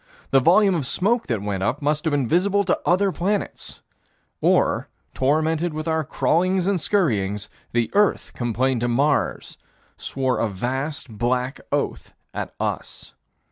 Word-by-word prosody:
The 135 - +6
volume 190 +8 +5
of 150 -7 -1
smoke 220 - +1
that 110 -5 -1
went 100 -2 -2
up 125 +9 0
must 150 +2 0
have 160 - +1
been 140 -4 +1
visible 200 - +2
to 185 - +1
other 190 +2 +3
planets 200 +3 -3 0.6
or, - - +2 0.3
tormented 155 +4 +1
with 155 +1 -4
our 160 -1 +1
crawlings 180 +5 +1
and 195 -2 +1
scurryings, 105 - 0 0.2
the 120 -1 0
earth 205 0 +2
complained 120 +1 0
to 120 - +1
Mars; 140 +4 0 0.4
swore 130 -1 -1
a 115 - +1
vast 130 +10 -3
black 125 +4 -1
oath - - -2 0.2
at - - -4
us. - - -4
145 Hz, 145 wpm, -23 LUFS, 120-180 Hz, 0.6 s, The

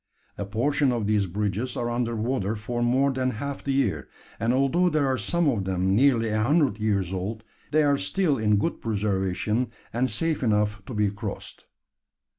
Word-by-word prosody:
A 100 - -4
portion 130 +7 +1
of 115 -4 -1
these 105 -2 +2
bridges 105 +6 -2
are 120 0 -1
under 120 -1 -1
water 110 -2 -1
for 120 +3 -4
more 130 +4 +3
than 130 -1 0
half 140 +3 -5
the 140 - -1
year; 135 0 0 0.3
and 115 +3 +1
although 140 +8 +3
there 155 -3 +1
are 130 -1 +1
some 160 - 0
of 110 -9 +1
them 95 0 0
nearly 120 -2 +3
a 110 0 0
hundred 135 -3 +2
years 100 -4 0
old, 105 +4 -4 0.3
they 155 +2 +3
are 140 -1 +3
still 160 -5 0
in 105 -1 +3
good 100 - -1
preservation, 105 +2 -1 0.2
and 125 +3 +1
safe 165 -2 -1
enough 105 -3 +1
to 125 - -6
be 105 -1 +2
crossed. 105 0 -7
115 Hz, 185 wpm, -26 LUFS, 105-135 Hz, 0.3 s, more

